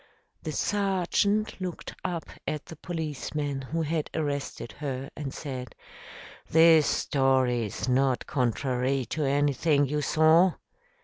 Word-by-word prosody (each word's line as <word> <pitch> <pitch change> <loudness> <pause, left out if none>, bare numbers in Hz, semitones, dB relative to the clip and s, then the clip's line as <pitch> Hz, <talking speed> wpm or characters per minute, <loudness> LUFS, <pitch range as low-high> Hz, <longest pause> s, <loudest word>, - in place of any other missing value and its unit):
The 155 - -4
sergeant 200 +3 0
looked 180 -2 -5
up 170 -2 -3 0.2
at 150 -1 -3
the 165 - -10
policeman 150 -3 -4
who 160 +5 -2
had 155 0 -1
arrested 145 -5 -3
her 135 -2 -4
and 145 -3 -5
said, 130 -6 -6 0.7
"This 160 -1 +6
story 130 -4 +2
is 105 - -5
not 130 -1 +2
contrary 130 +1 0
to 155 - -1
anything 145 +1 +2
you 150 +2 -1
saw?" 160 +4 +5
145 Hz, 120 wpm, -27 LUFS, 135-160 Hz, 0.7 s, This